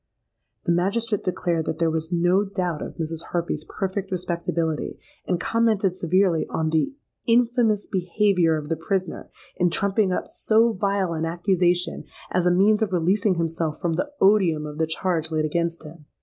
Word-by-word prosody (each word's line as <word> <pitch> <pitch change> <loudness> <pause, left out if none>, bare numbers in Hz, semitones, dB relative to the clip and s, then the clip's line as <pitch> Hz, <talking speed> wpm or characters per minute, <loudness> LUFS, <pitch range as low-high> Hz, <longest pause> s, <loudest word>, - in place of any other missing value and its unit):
The 170 - +1
magistrate 200 +5 0
declared 175 -3 -1
that 160 - -2
there 165 -1 +1
was 160 +1 -3
no 175 +3 +3
doubt 180 -6 -3
of - - -6
Mrs. 165 -1 -4
Harpy's 170 -3 -2
perfect 195 +2 -4
respectability, 170 -3 -2 0.3
and 180 -2 0
commented 215 -4 +1
severely 180 -1 +2
on 160 -1 -1
the 160 - 0 0.3
'_infamous 230 -3 +3
behaviour 180 -2 +2
of 150 -1 -6
the 165 - +1
prisoner, 185 +3 -3 0.3
in 180 -1 +3
trumping 200 +2 +1
up - - -2
so 225 +1 +2
vile 195 -3 0
an 160 0 -2
accusation, 175 +1 0 0.3
as 180 -1 +1
a - - +4
means 205 +4 +4
of 215 -3 0
releasing 185 +4 +2
himself 165 -2 -2
from 170 -2 -1
the 235 - -2
odium 185 -6 +3
of 150 +1 -7
the 160 - +1
charge 160 -1 -1
laid 155 -1 0
against 170 +2 -1
him_.' 155 +1 -12
180 Hz, 165 wpm, -24 LUFS, 165-200 Hz, 0.3 s, a